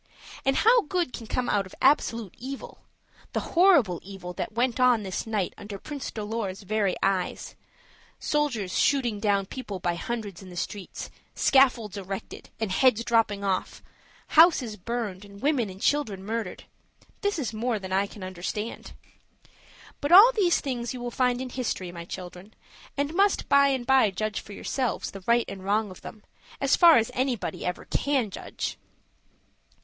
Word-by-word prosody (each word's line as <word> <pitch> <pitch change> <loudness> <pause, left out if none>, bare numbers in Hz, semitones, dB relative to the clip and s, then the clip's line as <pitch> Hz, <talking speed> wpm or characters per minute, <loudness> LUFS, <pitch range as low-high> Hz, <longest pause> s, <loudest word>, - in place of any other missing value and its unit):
And 270 0 +3
how 470 +2 +5
good 350 -6 -1
can 230 - -7
come 250 +2 -1
out 200 -2 +1
of - - -14
absolute 235 - +2
evil 265 +3 -7 0.5
the - - +1
horrible 335 - +5
evil 190 -2 -8
that 180 - -4
went 240 +2 0
on 250 -4 +4
this 190 +3 -4
night 210 -5 -1
under 205 -1 -7
Prince 285 +6 -6
Dolor's 210 -2 -4
very 205 -2 0
eyes 190 -2 -1 0.6
soldiers 250 -11 -1
shooting 245 -7 +2
down 200 -2 +1
people 205 -3 -6
by 175 0 0
hundreds 205 0 -5
in 190 - -11
the 180 - -11
streets, 190 +2 -5 0.2
scaffolds 245 -7 +3
erected, 195 0 -7
and 220 -4 -2
heads 230 +2 +3
dropping 225 -4 +1
off 190 -2 -2 0.5
houses 305 -9 +5
burned, 210 -2 -4
and 200 0 -13
women 270 -5 +1
and 190 0 -10
children 215 -10 0
murdered 225 +1 -4 0.6
this 405 -3 0
is 255 -7 -3
more 230 +1 -1
than 190 -2 -6
I 195 +1 +2
can 200 -1 -11
understand. 185 +4 -5 1.1
But 285 - -2
all 405 +7 +10
these 390 -8 +2
things 245 -2 -3
you - - -6
will 240 0 -4
find 250 0 +1
in 255 -1 -5
history, 220 -8 -3
my 170 -1 -8
children, 180 +3 -9 0.4
and 285 +2 -1
must 395 +3 +2
by 280 0 +5
and 265 -3 0
by 260 -4 +5
judge 210 +2 -3
for 205 - -11
yourselves 255 +3 -2
the 195 -1 -10
right 235 0 +4
and 195 -1 -8
wrong 205 +1 0
of 185 - -12
them, 215 - -10 0.4
as 275 0 +3
far 340 -3 +8
as 225 -1 +1
anybody 255 -3 -2
ever 180 - -3
can 265 -7 0
judge. - - -5
225 Hz, 165 wpm, -26 LUFS, 195-265 Hz, 1.1 s, all